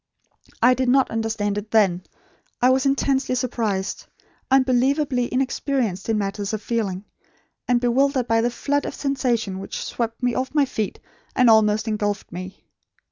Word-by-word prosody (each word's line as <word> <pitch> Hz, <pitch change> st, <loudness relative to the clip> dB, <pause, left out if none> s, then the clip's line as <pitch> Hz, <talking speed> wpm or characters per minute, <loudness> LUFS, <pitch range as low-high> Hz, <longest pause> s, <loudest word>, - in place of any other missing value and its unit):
I 250 Hz, +2 st, +7 dB
did 255 Hz, 0 st, 0 dB
not 265 Hz, +1 st, +3 dB
understand 220 Hz, -2 st, -1 dB
it 210 Hz, +1 st, -11 dB
then. 195 Hz, -5 st, +3 dB, 0.6 s
I 250 Hz, +1 st, +4 dB
was 265 Hz, +1 st, +2 dB
intensely 270 Hz, -1 st, +1 dB
surprised; 225 Hz, -6 st, -2 dB, 0.4 s
unbelievably 260 Hz, 0 st, +2 dB
inexperienced 255 Hz, -6 st, -1 dB
in 220 Hz, -, +2 dB
matters 200 Hz, 0 st, -3 dB
of 215 Hz, -1 st, -3 dB
feeling; 205 Hz, -5 st, -2 dB, 0.6 s
and 245 Hz, -1 st, +3 dB
bewildered 255 Hz, +1 st, +1 dB
by 225 Hz, 0 st, +3 dB
the 240 Hz, -, +1 dB
flood 285 Hz, +4 st, -1 dB
of -, -, -5 dB
sensation 240 Hz, -8 st, -1 dB
which 195 Hz, -, -6 dB
swept 230 Hz, +1 st, -4 dB
me 245 Hz, -1 st, +2 dB
off 260 Hz, +4 st, -3 dB
my 290 Hz, -2 st, +4 dB
feet 220 Hz, -6 st, -4 dB, 0.4 s
and 250 Hz, -3 st, +5 dB
almost 215 Hz, 0 st, +3 dB
engulfed 210 Hz, -1 st, -2 dB
me. 185 Hz, +2 st, -8 dB
235 Hz, 150 wpm, -23 LUFS, 210-260 Hz, 0.6 s, I